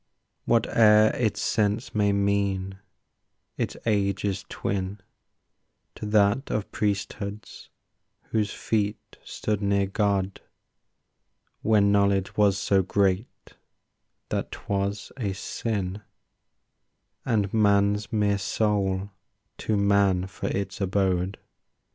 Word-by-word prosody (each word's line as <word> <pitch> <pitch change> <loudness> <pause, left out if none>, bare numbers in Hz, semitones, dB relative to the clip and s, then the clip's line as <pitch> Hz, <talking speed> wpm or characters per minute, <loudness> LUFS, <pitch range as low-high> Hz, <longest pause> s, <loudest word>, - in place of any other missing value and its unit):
Whate'er 110 -2 +5
its 110 -4 0
sense 105 +2 0
may 105 -1 +2
mean, 100 -1 0 0.8
its - - -3
age 100 -3 +1
is 95 -2 -2
twin 95 +1 -3 0.9
To 105 - -6
that 105 +5 +2
of 105 -1 -2
priesthoods 100 0 -4 0.6
whose 105 -2 0
feet 105 -2 -2
stood 105 -1 -3
near 100 -1 +2
God, 100 -1 -1 1.2
When 105 -2 +4
knowledge 100 -1 +2
was 100 -2 +3
so 95 +1 +2
great 95 +2 +1 1.0
that - - -2
'twas 100 0 -3
a 105 -7 -2
sin 100 -1 -3 1.2
And 105 -6 0
man's 105 -1 +2
mere 105 -2 +1
soul 100 -1 0 0.5
too 110 - 0
man 100 -2 +3
for 95 - -6
its 100 +2 -3
abode. 95 -1 0
100 Hz, 100 wpm, -26 LUFS, 95-105 Hz, 1.2 s, Whate'er